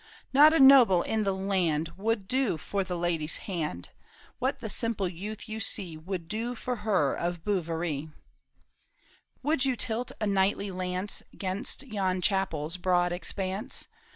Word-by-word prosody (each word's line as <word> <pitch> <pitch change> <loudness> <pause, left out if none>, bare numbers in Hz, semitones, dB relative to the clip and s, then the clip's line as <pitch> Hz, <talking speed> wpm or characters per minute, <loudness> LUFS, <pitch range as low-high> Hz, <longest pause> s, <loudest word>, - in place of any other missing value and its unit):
" - - -25
Not 295 +3 +8
a 325 - +3
noble 255 -10 +8
in 220 -1 -1
the 195 - +2
land 180 -5 0
Would 210 0 -1
do 255 -8 +1
for 195 +6 -2
the 180 -1 -4
lady's 170 -2 0
hand, 150 - -3 0.5
What 270 +2 -1
the 230 - -5
simple 220 -2 0
youth 200 +6 -7
you 220 0 -5
see 190 -6 0
Would 170 +2 -5 0.2
for 250 +1 -3
her 195 -10 +1
of 175 -1 -3
Bouverie." 165 -6 -1 0.7
" - - -36
Would 295 -1 +1
you 265 -2 +2
tilt 235 +1 -1
a 215 - 0
knightly 200 0 +1
lance 185 +2 -3 0.2
'Gainst 195 +7 -1
yon 195 -7 -1
chapel's 180 -4 0
broad 180 -1 +2
expanse 190 +6 -3
190 Hz, 155 wpm, -28 LUFS, 175-220 Hz, 0.7 s, Not